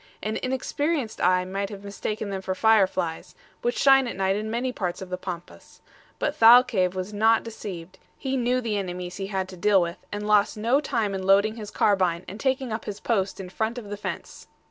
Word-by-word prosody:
An 215 +1 -2
inexperienced 265 0 -2
eye 185 0 +3
might 195 +1 -3
have 200 -1 -9
mistaken 205 +1 -4
them 190 -1 -3
for 190 0 -3
fireflies, 190 -6 +1 0.3
which 240 +1 -1
shine 270 -2 +5
at - - -5
night 190 0 +1
in 215 +1 -3
many 240 +3 -1
parts 180 -6 -3
of 190 - -8
the - - 0
Pampas; 175 -2 -9 0.4
but 295 - -1
Thalcave 225 -7 +6
was 185 +3 -4
not 220 +2 +3
deceived; 190 -5 -8 0.2
he 265 -1 -2
knew 250 0 +1
the 220 -3 -1
enemies 180 -1 -5
he 195 - -4
had 190 -2 -2
to 185 - -9
deal 200 +2 +4
with, 170 -1 -2
and 205 0 -4
lost 210 0 +3
no 235 +6 +2
time 225 -9 -1
in 190 - -3
loading 200 +3 +4
his 215 -3 -7
carbine 185 -5 +1
and 200 +4 -8
taking 265 -2 -1
up 220 - -4
his 205 -1 -5
post 195 -5 -1
in 185 -2 -7
front 220 +5 -2
of 210 -4 -8
the - - -2
fence. 205 - -7
205 Hz, 210 wpm, -25 LUFS, 190-230 Hz, 0.4 s, Thalcave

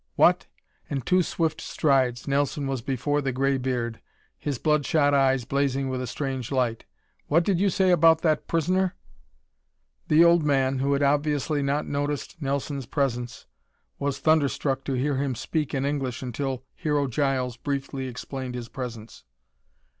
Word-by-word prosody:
"What!" - - +4 0.4
In 140 -2 -2
two 185 +9 +3
swift 160 -2 -1
strides 130 -5 +1
Nelson 140 +1 0
was 135 -3 -2
before 135 +3 -1
the 135 -1 -1
gray 135 +1 +1
beard, 125 -3 -2 0.4
his 145 -3 -2
blood 150 +2 +2
shot 145 -2 +2
eyes 135 -3 +3
blazing 135 0 0
with 130 -1 -2
a 130 - -4
strange 130 -1 -4
light. 125 -4 0 0.4
"What 165 +4 +3
did 185 -1 +1
you 200 +1 +3
say 185 0 +2
about 165 -1 +5
that 155 -3 +1
prisoner?" 180 +3 +1 1.1
The 160 +3 +6
old 170 -1 +5
man, 135 -2 +2
who 140 +1 +1
had 140 +1 +1
obviously 145 +1 +1
not 140 +2 0
noticed 145 +4 -3
Nelson's 140 -1 -2
presence, 125 -3 -2 0.5
was 140 -1 -1
thunderstruck 140 -2 +1
to 135 - -2
hear 135 +2 0
him 135 -2 -1
speak 150 +4 -2
in 135 0 0
English 135 -4 -2
until 130 +1 -3
Hero 150 -2 0
Giles 130 -2 0
briefly 135 0 -3
explained 130 +1 -6
his 120 -1 -6
presence. 115 -4 -7
140 Hz, 155 wpm, -26 LUFS, 130-150 Hz, 1.1 s, The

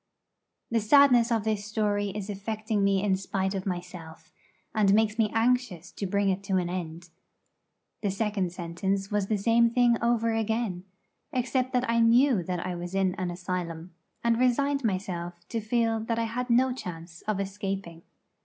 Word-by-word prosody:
The 230 - +3
sadness 245 +1 +5
of 225 -3 +1
this 215 -2 -1
story 205 -1 -1
is 200 0 -5
affecting 210 +1 -2
me 195 -1 +2
in 195 -2 +2
spite 190 0 -2
of 195 0 -4
myself, 175 -3 -7 0.4
and 205 -2 +4
makes 220 0 +1
me 215 -2 +3
anxious 225 -6 0
to 200 - -4
bring 200 +1 +1
it 190 +1 0
to 195 -1 +1
an 175 -1 -1
end. 170 -1 -6 0.9
The 205 - 0
second 195 -2 -1
sentence 190 +3 -3
was 205 -2 0
the 215 - +1
same 230 +3 +4
thing 240 0 +3
over 230 -1 +2
again, 220 -4 -1 0.5
except 255 +1 0
that 250 0 +1
I 230 0 +2
knew 235 -1 +5
that 175 0 -3
I 185 - -2
was 175 +1 -6
in 190 -1 +2
an 185 -1 -3
asylum, 175 -1 -5 0.3
and 235 0 +2
resigned 275 +3 +2
myself 185 -4 -2
to 230 - -2
feel 225 +1 +1
that 225 +1 -2
I 230 - +1
had 245 +3 -3
no 250 +2 +3
chance 165 -7 -8
of 215 -2 0
escaping. 195 -3 -4
205 Hz, 170 wpm, -27 LUFS, 185-230 Hz, 0.9 s, sadness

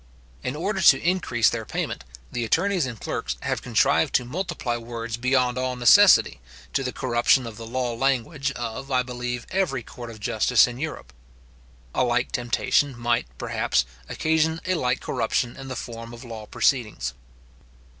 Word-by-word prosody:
In 130 - -3
order 190 +5 -2
to - - +7
increase 145 -11 +2
their 115 -1 -3
payment, 65 - -4 0.3
the 120 - -2
attorneys 175 - +1
and 115 -4 -7
clerks - - -3
have - - -2
contrived - - +2
to 125 - +3
multiply 160 -4 -3
words 115 -1 -5
beyond 125 0 +1
all 130 0 -1
necessity, 115 - +6 0.3
to 135 - +1
the 130 - -2
corruption 125 0 +2
of 115 -2 -8
the 115 -1 -8
law 125 0 -2
language 135 +3 0
of, 120 +2 -5
I 130 -2 +2
believe, 125 -1 -4
every 165 -10 0
court 120 +1 -9
of 110 -1 -10
justice 115 +3 +4
in 120 0 -6
Europe. 145 - -6 0.8
A - - +2
like 120 0 +1
temptation 125 +2 +1
might, 120 - 0
perhaps, 65 0 0 0.2
occasion 160 0 +1
a 185 - +1
like 125 -7 0
corruption 120 +1 -1
in 135 - -9
the 130 - -5
form 115 0 -7
of 115 - -12
law 110 -3 -8
proceedings. 110 - 0
125 Hz, 165 wpm, -24 LUFS, 115-135 Hz, 0.8 s, to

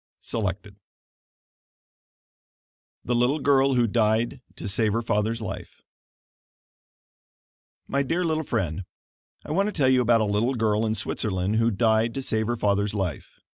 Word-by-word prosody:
Selected 100 -2 -4 2.3
THE 120 - 0
LITTLE 125 +5 +2
GIRL 135 -2 +3
WHO 120 -1 +3
DIED 115 +3 +1
TO - - -6
SAVE 105 +1 +1
HER 115 +1 -1
FATHER'S 110 +1 -1
LIFE 110 - -7 2.0
My 140 - 0
dear 165 +6 -1
little 160 -2 0
friend: 95 - -2 0.6
I - - -6
want 195 +6 +2
to - - -1
tell 140 -9 +2
you 130 -1 +4
about 115 -1 +3
a - - +2
little 105 +6 0
girl 110 -1 +1
in 110 - 0
Switzerland 100 -1 -1
who 115 +1 +3
died 110 +1 +1
to 135 - -3
save 110 -3 -1
her 120 0 -1
father's 100 0 0
life. 95 -7 -4
115 Hz, 145 wpm, -25 LUFS, 105-125 Hz, 2.3 s, you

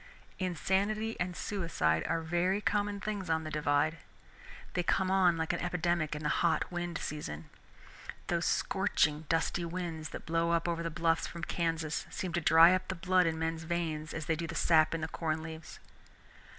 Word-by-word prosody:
Insanity 200 +5 0
and 180 0 -2
suicide 165 - 0
are 165 0 -1
very 175 +4 +1
common 205 -1 0
things 200 -3 -4
on 160 0 +1
the 155 - -6
Divide. 150 +1 +1 0.7
They 180 - +1
come 185 +2 +1
on 180 -3 +4
like 160 +1 -1
an 175 - -2
epidemic 175 -3 0
in 150 - -6
the 150 - +1
hot 170 +1 +1
wind 175 -1 -3
season. 80 - -6 0.7
Those - - 0
scorching 150 +1 +1
dusty 165 +1 +1
winds 170 -2 -4
that - - -8
blow 165 +1 +1
up 170 0 +1
over 170 -1 -1
the 165 - -2
bluffs 165 0 +1
from 170 0 -8
Kansas 165 -3 -1
seem 180 -3 -4
to 175 - 0
dry 165 +3 +7
up 185 - -1
the 190 - -3
blood 180 +1 +3
in 160 -1 -1
men's 160 0 -2
veins 160 -2 -2
as 165 -2 -4
they 160 - +1
do 165 +1 -4
the - - -6
sap 160 -1 +4
in 165 - -3
the 160 - -2
corn 160 -1 -2
leaves. 160 0 -8
165 Hz, 185 wpm, -32 LUFS, 160-180 Hz, 0.7 s, dry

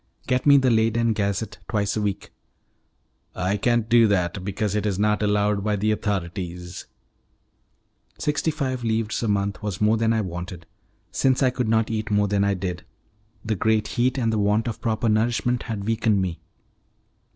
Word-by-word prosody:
"Get 125 +2 0
me 140 0 +8
the 130 -2 +3
Leyden 115 +1 +2
Gazette 105 +1 -2
twice 105 -2 0
a 110 - -1
week." 100 -2 -3 1.0
"I 95 +2 0
can't 120 +1 +1
do 115 -1 +5
that, 90 -2 0
because 100 +1 -2
it 105 0 0
is 100 -3 -1
not 105 +1 +1
allowed 105 -1 +1
by 105 0 +1
the 105 +2 +1
authorities." 90 -4 -4 1.3
Sixty 150 +2 0
five 130 -5 -2
livres 110 -1 -1
a 115 - -1
month 100 -1 -1
was 105 -4 -4
more 105 +1 +3
than 110 0 +2
I 110 -1 +1
wanted, 85 -2 -6 0.5
since 130 +1 +2
I 130 - +4
could 125 -2 -2
not 110 0 +2
eat 110 -1 -2
more 105 -1 +2
than 100 0 +1
I 100 0 +1
did: 90 -1 -4 0.6
the 110 0 0
great 110 +2 +1
heat 130 +2 0
and 115 -3 +1
the 110 - 0
want 105 +3 +1
of 115 - -4
proper 115 0 0
nourishment 120 +3 +1
had 105 -3 -3
weakened 110 -1 +1
me. 90 -3 -2
105 Hz, 175 wpm, -24 LUFS, 100-115 Hz, 1.3 s, me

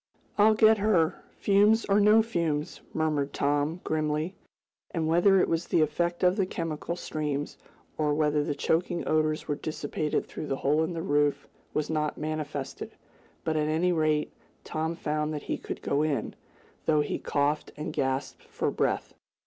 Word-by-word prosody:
"I'll 215 +1 +5
get 220 0 +5
her, 190 -6 +2
fumes 210 +3 +4
or 200 0 +3
no 210 +2 +6
fumes!" 165 -9 -2
murmured 150 -3 0
Tom, 145 +4 0
grimly. 155 +2 -1 0.6
And, 160 -2 -1
whether 175 +4 +5
it - - +3
was 165 +1 -1
the 165 - +3
effect 170 +4 0
of 180 +2 +4
the 195 -3 +1
chemical 165 -1 -3
streams, 150 -4 -3 0.4
or 150 -1 +2
whether 150 -1 +2
the 145 - -2
choking 170 +3 0
odors 155 0 +1
were 150 - 0
dissipated 150 0 -2
through 155 - -7
the 135 - -1
hole 150 +4 +2
in 165 +2 -2
the 165 -1 -4
roof 145 -4 +1 0.3
was 155 +1 0
not 150 -1 -1
manifested, 150 -2 -4 0.5
but, 160 - -1
at 150 -1 +1
any 165 +4 +2
rate, 155 -2 +1 0.3
Tom 160 +2 -2
found 150 -1 -2
that 145 - -5
he - - -2
could - - -7
go 145 - +1
in, 155 -2 -1 0.5
though 155 -1 +4
he 145 - -2
coughed 145 +1 0
and 155 +1 -4
gasped 135 0 -2
for - - -2
breath. - - -1
155 Hz, 165 wpm, -28 LUFS, 150-175 Hz, 0.6 s, no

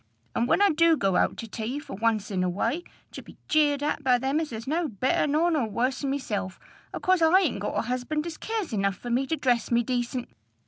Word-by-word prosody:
And 235 - 0
when 400 - +3
I 405 - +6
do 330 +1 +4
go 195 -6 +1
out - - +2
to 230 - -6
tea 225 +4 -4
for 295 - -8
once 215 -1 0
in 185 -2 0
a 180 - +1
way, 275 - -1 0.3
to - - -8
be - - -15
jeered 290 -2 +2
at 300 0 -1
by 250 -2 +4
them 270 +4 0
as 315 -4 -3
is 225 0 -6
no 320 +4 0
better 260 +5 0
nor 315 +4 +2
no 300 -7 +1
worse 255 +6 -1
'n 275 - 0
myself, 205 -9 -3 0.3
acause 370 -2 +1
I 335 +4 +6
ain't 270 - 0
got 205 - -3
a - - +2
husband 255 +6 -2
as 335 -2 -6
cares 435 - -3
enough 195 -2 0
for 240 - -6
me 260 +3 +1
to 320 - 0
dress 250 -5 +1
me 235 0 +3
decent! 245 0 -2
260 Hz, 240 wpm, -26 LUFS, 230-310 Hz, 0.3 s, I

